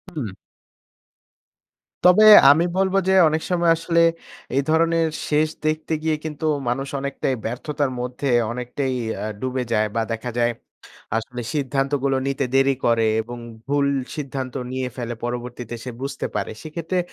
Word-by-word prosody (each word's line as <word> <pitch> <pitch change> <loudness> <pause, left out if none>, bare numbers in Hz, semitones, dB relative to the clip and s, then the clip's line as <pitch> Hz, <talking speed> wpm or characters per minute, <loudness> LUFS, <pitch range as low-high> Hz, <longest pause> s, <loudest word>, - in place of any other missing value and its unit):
হুম। 125 -8 -3 1.8
তবে 180 +4 +7 0.3
আমি 160 +4 +4
বলব 190 0 +2
যে, 190 - +4 0.2
"অনেক 155 +1 -1
সময় 170 -2 +3
আসলে 170 0 +1 0.6
এই 140 - +4
ধরনের 165 +1 +3 0.2
শেষ 155 +1 +2 0.2
দেখতে 155 +1 -1
গিয়ে 160 -1 +1
কিন্তু 155 0 -4 0.2
মানুষ 135 +3 -2
অনেকটাই 135 -1 -2
ব্যর্থতার 140 +4 -2
মধ্যে 125 +3 -3 0.2
অনেকটাই 125 +2 -3 0.2
অ্যা - - -5
ডুবে 130 +1 -2
যায়" 110 -1 +2
বা 115 - +2
দেখা 115 +2 -3
যায় 120 0 +2 0.7
আসলে 120 +2 -5
সিদ্ধান্তগুলো 135 -1 0
নিতে 135 0 0
দেরি 135 0 +4
করে 115 -1 +3
এবং 120 +2 -8 0.3
ভুল 140 0 +2 0.3
সিদ্ধান্ত 135 -3 -4 0.2
নিয়ে 130 0 -2
ফেলে 120 -1 -4
পরবর্তীতে 120 0 -5
সে 125 - -5
বুঝতে 140 - -4
পারে। - - -2
সেক্ষেত্রে 165 +3 -3
135 Hz, 140 wpm, -22 LUFS, 125-155 Hz, 1.8 s, তবে